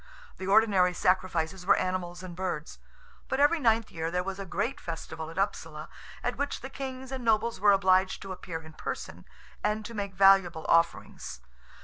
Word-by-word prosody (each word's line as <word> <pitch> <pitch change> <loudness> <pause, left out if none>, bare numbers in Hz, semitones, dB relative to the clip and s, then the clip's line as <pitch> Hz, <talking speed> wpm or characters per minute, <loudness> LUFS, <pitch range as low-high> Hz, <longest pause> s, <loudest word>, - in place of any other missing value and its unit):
The 190 - -5
ordinary 195 -3 +4
sacrifices 185 -1 0
were 185 - +5
animals 185 -1 -2
and 180 -2 -8
birds; 175 -4 -4 0.5
but 265 - 0
every 295 +4 +4
ninth 225 -4 +2
year 165 0 -3
there 180 +1 -1
was 195 +1 -5
a 195 - -6
great 230 +9 -2
festival 160 -1 -6
at 165 - -11
Upsala, 160 -5 -2 0.3
at 245 - -1
which 285 +1 -2
the 265 - -7
kings 265 -1 -6
and 260 -2 -4
nobles 225 0 +2
were 205 +1 +6
obliged 190 -1 +3
to 195 - -7
appear 165 -3 -6
in 160 0 -12
person, - - -6 0.4
and 210 0 0
to 235 - -7
make 200 -3 -4
valuable 195 -4 +5
offerings. 65 - +1
190 Hz, 175 wpm, -29 LUFS, 175-220 Hz, 0.5 s, were